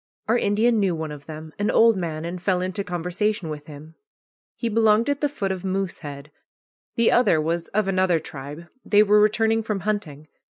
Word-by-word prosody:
Our 225 Hz, -, +3 dB
Indian 220 Hz, +3 st, +2 dB
knew 190 Hz, -4 st, +1 dB
one 160 Hz, -1 st, -5 dB
of 145 Hz, -1 st, -10 dB
them, 155 Hz, 0 st, -9 dB
an 205 Hz, -, +1 dB
old 230 Hz, 0 st, +5 dB
man, 165 Hz, -3 st, -4 dB
and 175 Hz, +1 st, -5 dB
fell 185 Hz, 0 st, +1 dB
into 185 Hz, +2 st, -3 dB
conversation 180 Hz, +1 st, -2 dB
with 150 Hz, 0 st, -7 dB
him. 155 Hz, +1 st, -11 dB, 0.6 s
He 235 Hz, -, -3 dB
belonged 225 Hz, +2 st, +3 dB
at 285 Hz, -, -3 dB
the 290 Hz, -, +1 dB
foot 200 Hz, -9 st, -3 dB
of 190 Hz, -1 st, -4 dB
Moosehead. 165 Hz, -7 st, -4 dB, 0.6 s
The 235 Hz, -1 st, +3 dB
other 240 Hz, -10 st, +4 dB
was 165 Hz, +2 st, -1 dB
of 210 Hz, -1 st, -1 dB
another 185 Hz, -3 st, +2 dB
tribe. 145 Hz, +2 st, -9 dB, 0.2 s
They 210 Hz, 0 st, +5 dB
were 210 Hz, 0 st, +4 dB
returning 220 Hz, +1 st, +2 dB
from 215 Hz, -3 st, -3 dB
hunting. 160 Hz, -8 st, -3 dB
190 Hz, 190 wpm, -23 LUFS, 160-215 Hz, 0.6 s, old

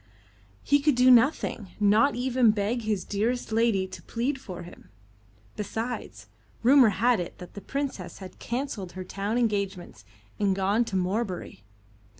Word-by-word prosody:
He 285 Hz, +1 st, +3 dB
could 290 Hz, -1 st, +2 dB
do 250 Hz, +1 st, +6 dB
nothing 235 Hz, -, +2 dB
not 215 Hz, +6 st, +4 dB
even 250 Hz, -1 st, +2 dB
beg 215 Hz, +3 st, 0 dB
his 210 Hz, -4 st, -2 dB
dearest 225 Hz, +4 st, -1 dB
lady 220 Hz, -4 st, +2 dB
to 185 Hz, 0 st, -10 dB
plead 260 Hz, +4 st, -3 dB
for 180 Hz, -8 st, -8 dB
him. 175 Hz, -, -14 dB, 0.7 s
Besides, 220 Hz, -, -5 dB, 0.4 s
rumour 255 Hz, -1 st, +7 dB
had 225 Hz, +3 st, +2 dB
it 175 Hz, -, -6 dB
that 180 Hz, -, -11 dB
the 200 Hz, -, -8 dB
Princess 265 Hz, -12 st, -4 dB
had 185 Hz, -2 st, -11 dB
cancelled 235 Hz, -7 st, -4 dB
her 185 Hz, -, -6 dB
town 200 Hz, +4 st, -3 dB
engagements 200 Hz, -, -2 dB, 0.4 s
and 200 Hz, -2 st, +2 dB
gone 200 Hz, +5 st, +1 dB
to 225 Hz, -4 st, -5 dB
Morebury. 185 Hz, -, -2 dB
215 Hz, 150 wpm, -27 LUFS, 190-245 Hz, 0.7 s, rumour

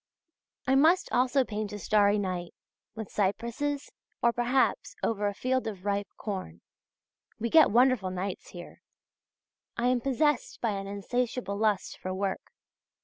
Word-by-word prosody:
I 265 Hz, -, +2 dB
must 320 Hz, +7 st, +4 dB
also 255 Hz, +2 st, +3 dB
paint 210 Hz, -2 st, -4 dB
a -, -, -4 dB
starry 205 Hz, 0 st, +3 dB
night, 180 Hz, -3 st, -3 dB, 0.4 s
with 220 Hz, -2 st, -6 dB
cypresses, 235 Hz, +8 st, -1 dB, 0.3 s
or, 235 Hz, -, +4 dB
perhaps, 245 Hz, +2 st, +1 dB
over 210 Hz, -2 st, 0 dB
a 205 Hz, -, -2 dB
field 255 Hz, +2 st, 0 dB
of 200 Hz, -3 st, -6 dB
ripe 200 Hz, 0 st, 0 dB
corn. 185 Hz, -, -5 dB, 0.8 s
We 235 Hz, +1 st, -3 dB
get 320 Hz, -1 st, +7 dB
wonderful 240 Hz, -3 st, +3 dB
nights 185 Hz, +1 st, -4 dB
here. 175 Hz, -1 st, -11 dB, 1.0 s
I 240 Hz, +1 st, +2 dB
am 250 Hz, -1 st, +2 dB
possessed 285 Hz, +4 st, 0 dB
by 230 Hz, -, 0 dB
an 195 Hz, -1 st, -4 dB
insatiable 225 Hz, +2 st, -2 dB
lust 210 Hz, -2 st, 0 dB
for 185 Hz, -, -4 dB
work. 195 Hz, 0 st, -3 dB
215 Hz, 145 wpm, -29 LUFS, 200-250 Hz, 1.0 s, get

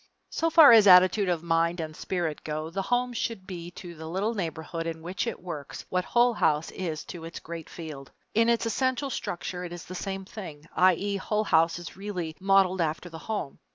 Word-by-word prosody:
So 330 Hz, -, +1 dB
far 320 Hz, -4 st, +9 dB
as 220 Hz, -3 st, +8 dB
attitude 185 Hz, +2 st, +7 dB
of 170 Hz, -2 st, 0 dB
mind 170 Hz, +1 st, +1 dB
and 155 Hz, -1 st, -5 dB
spirit 170 Hz, -4 st, -3 dB
go, 155 Hz, +1 st, -4 dB
the 195 Hz, -, -2 dB
home 245 Hz, +4 st, 0 dB
should 225 Hz, -4 st, -3 dB
be 175 Hz, -3 st, -7 dB
to 175 Hz, -2 st, -8 dB
the 160 Hz, -1 st, -9 dB
little 195 Hz, +7 st, -1 dB
neighborhood 165 Hz, -3 st, -4 dB
in 160 Hz, -1 st, -5 dB
which 180 Hz, +2 st, -3 dB
it -, -, -3 dB
works 155 Hz, -6 st, -7 dB
what 180 Hz, 0 st, 0 dB
Hull 240 Hz, 0 st, +3 dB
House 155 Hz, -6 st, +1 dB
is 165 Hz, -4 st, -4 dB
to 170 Hz, -2 st, -8 dB
its 165 Hz, 0 st, -7 dB
great 165 Hz, -1 st, -8 dB
field. 150 Hz, -5 st, -8 dB, 0.2 s
In 230 Hz, +1 st, +3 dB
its 235 Hz, 0 st, +2 dB
essential 260 Hz, +4 st, 0 dB
structure 180 Hz, -3 st, -4 dB
it 175 Hz, -, -6 dB
is 175 Hz, -1 st, -8 dB
the 185 Hz, -, -8 dB
same 195 Hz, +1 st, -4 dB
thing; 165 Hz, -8 st, -9 dB
i.e. 185 Hz, +2 st, +3 dB
Hull 210 Hz, +2 st, -1 dB
House 165 Hz, -4 st, +3 dB
is 175 Hz, -, -9 dB
really 180 Hz, -5 st, -4 dB
modeled 190 Hz, -1 st, +3 dB
after 160 Hz, +2 st, -2 dB
the 165 Hz, -1 st, -9 dB
home. 205 Hz, -10 st, -3 dB
180 Hz, 205 wpm, -27 LUFS, 165-205 Hz, 0.2 s, far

